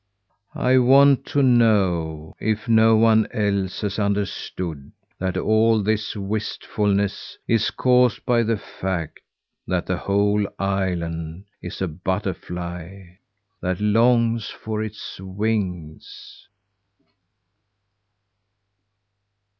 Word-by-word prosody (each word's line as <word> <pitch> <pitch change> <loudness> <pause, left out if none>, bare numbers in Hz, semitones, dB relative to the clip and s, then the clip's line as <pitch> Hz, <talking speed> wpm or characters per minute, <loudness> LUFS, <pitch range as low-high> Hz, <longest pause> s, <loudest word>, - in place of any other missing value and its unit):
I 130 +1 +3
want 135 +2 +5
to 140 - +1
know 95 -11 +2
if 110 +2 -2
no 110 -1 +5
one 110 0 +4
else 100 -3 -1
has 105 0 -2
understood 95 -7 -3 0.3
that 95 0 -2
all 110 0 +3
this 110 +1 -1
wistfulness 100 0 -2
is 115 -1 +2
caused 125 -3 +2
by 120 -1 +3
the 115 -1 0
fact 95 -5 -5 0.5
that - - -1
the - - -1
whole 100 +1 +1
island 90 -3 -3 0.2
is - - -5
a - - 0
butterfly 90 0 -5 0.4
that 90 -1 -2
longs 115 +1 +2
for 110 -1 -5
its 110 -3 -7
wings." 95 -5 -4
100 Hz, 95 wpm, -22 LUFS, 95-110 Hz, 0.5 s, want